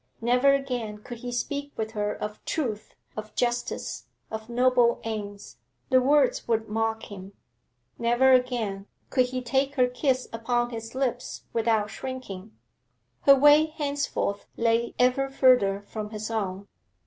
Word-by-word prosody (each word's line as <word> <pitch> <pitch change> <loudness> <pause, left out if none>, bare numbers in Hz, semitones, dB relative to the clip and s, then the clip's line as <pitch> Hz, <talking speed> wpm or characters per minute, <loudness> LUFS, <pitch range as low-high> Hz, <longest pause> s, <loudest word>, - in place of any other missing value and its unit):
Never 250 +4 +4
again 245 -6 -3
could 240 -2 -8
he 245 +1 -5
speak 285 +4 -3
with 220 0 -3
her 210 -2 -1
of 210 0 -6
truth, 225 -10 -3 0.2
of 215 0 -7
justice, 240 0 -2 0.2
of 220 +1 -6
noble 245 -1 +3
aims; 205 -2 -6 0.3
the 255 0 +6
words 280 0 +3
would 225 -1 0
mock 225 +1 -1
him. 195 0 -9 0.7
Never 240 +3 +4
again 235 -6 +1 0.2
could 255 -2 +3
he 255 0 -4
take 270 +3 0
her 250 -2 +4
kiss 255 +1 0
upon 240 +1 0
his 225 +1 -7
lips 250 -2 -2
without 220 -2 +1
shrinking. 220 -6 -7 0.7
Her 275 - +10
way 295 +3 +6
henceforth 285 -9 -2
lay 230 0 +1
ever 255 +2 +2
further 250 -7 +3
from 215 -1 -5
his 215 +1 -5
own. 200 -3 -3
240 Hz, 140 wpm, -26 LUFS, 215-255 Hz, 0.7 s, Her